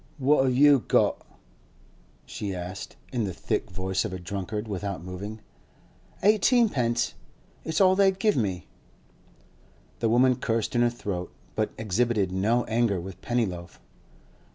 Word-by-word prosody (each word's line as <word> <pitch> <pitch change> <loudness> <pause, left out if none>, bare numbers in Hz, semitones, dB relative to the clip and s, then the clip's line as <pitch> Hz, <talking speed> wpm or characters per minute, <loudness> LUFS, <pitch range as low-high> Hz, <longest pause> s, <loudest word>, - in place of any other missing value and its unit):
'What 135 0 +3
have 130 -1 +1
you 145 0 +7
got?' - - +2 1.0
she 100 -3 -5
asked, 90 +1 -7 0.2
in 120 -3 0
the 95 - -3
thick - - -2
voice 95 +1 -2
of - - -4
a 95 - -4
drunkard, 100 +4 -4
without 100 -3 -4
moving. 100 +4 -7 0.8
'Eighteenpence; 210 - +3 0.5
it's 160 0 -1
all 190 -1 +5
they'd 195 -1 +3
give 210 +1 +2
me.' 95 - -1 1.3
The 115 - +1
woman 125 +2 +4
cursed 115 -1 -1
in 120 - +2
her 120 - +4
throat, 100 -7 -5 0.2
but 110 -1 0
exhibited 110 -2 0
no 110 +6 +1
anger 110 -4 +1
with 95 +1 -9
Pennyloaf. 95 -8 -2
110 Hz, 135 wpm, -26 LUFS, 95-125 Hz, 1.3 s, you